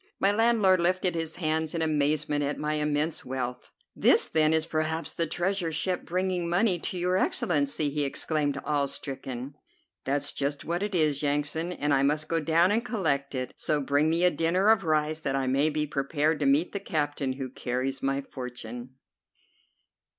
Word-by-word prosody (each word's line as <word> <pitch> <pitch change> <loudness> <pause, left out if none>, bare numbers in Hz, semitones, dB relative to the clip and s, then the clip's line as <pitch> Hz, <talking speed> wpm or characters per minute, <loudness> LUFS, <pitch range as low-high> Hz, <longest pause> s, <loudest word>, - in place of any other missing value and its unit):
My 195 - +4
landlord 210 -4 +3
lifted 180 +1 +1
his 165 -1 -3
hands 160 -1 -1
in 165 - 0
amazement 150 -1 +1
at 145 +1 -2
my 150 0 -2
immense 150 +1 -1
wealth. 125 -1 -4 0.3
"This, - - +4
then, 155 -1 +2
is 160 0 +3
perhaps 160 0 -2
the 165 - -1
treasure 175 +1 -1
ship 180 +4 -1
bringing 180 -1 -1
money 180 +1 +2
to 180 - -3
your 180 +1 +1
Excellency," 145 -5 +1
he 145 0 0
exclaimed, 145 0 -1
awestricken. 140 -2 -3 0.5
"That's 145 +1 -1
just 140 0 -3
what 170 +3 -2
it 205 -1 -2
is, 150 -4 +2
Yansan, 150 +4 -1
and 150 -4 0
I 135 - +3
must 150 +2 +1
go 165 - 0
down 165 +4 +3
and 225 +3 +1
collect 155 - -1
it; 130 -1 -4
so 150 - -1
bring 145 +2 +2
me 165 +2 +1
a 180 - +5
dinner 175 +6 +2
of 220 -3 +4
rice, 155 -1 +1
that 140 -3 -2
I 135 -1 0
may 135 +4 +2
be 150 0 -1
prepared 150 +2 0
to 145 - +1
meet 145 +6 +3
the 200 - -3
captain 145 -7 -2
who 130 -1 -6
carries 130 +2 -3
my 135 0 0
fortune." 125 -1 -7
155 Hz, 180 wpm, -27 LUFS, 140-170 Hz, 0.5 s, a